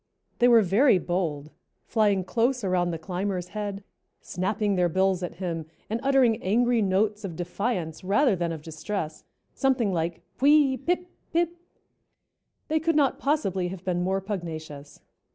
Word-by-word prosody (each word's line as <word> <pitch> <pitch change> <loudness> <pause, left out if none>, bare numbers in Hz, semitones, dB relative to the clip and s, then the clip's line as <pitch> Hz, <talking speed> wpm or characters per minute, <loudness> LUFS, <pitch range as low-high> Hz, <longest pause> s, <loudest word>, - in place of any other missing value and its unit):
They 245 - +5
were 235 -2 +6
very 205 +5 +4
bold, 160 -5 -2 0.3
flying 205 -4 +2
close 240 +5 0
around 180 -2 +1
the 165 - -3
climber's 180 +1 -3
head, 205 -1 -5 0.4
snapping 205 +3 -1
their 180 -2 +2
bills 190 +1 +1
at 180 - -5
him, 165 -3 -4 0.2
and 225 - 0
uttering 265 -5 +3
angry 235 +4 +2
notes 205 +2 +1
of 180 -5 -5
defiance 175 -1 -3
rather 210 +5 +3
than 170 -1 -2
of 160 -2 -6
distress, 160 0 -5 0.3
something 255 -7 +1
like 165 0 -2 0.2
"puy 285 0 +5
pip 355 +6 -1 0.3
pip." 340 0 +1 1.1
They 315 +1 +1
could 325 +1 0
not 285 -3 +2
possibly 195 - 0
have 180 0 -7
been 175 -1 0
more 190 +2 0
pugnacious. 160 -7 -6
195 Hz, 150 wpm, -26 LUFS, 175-240 Hz, 1.1 s, were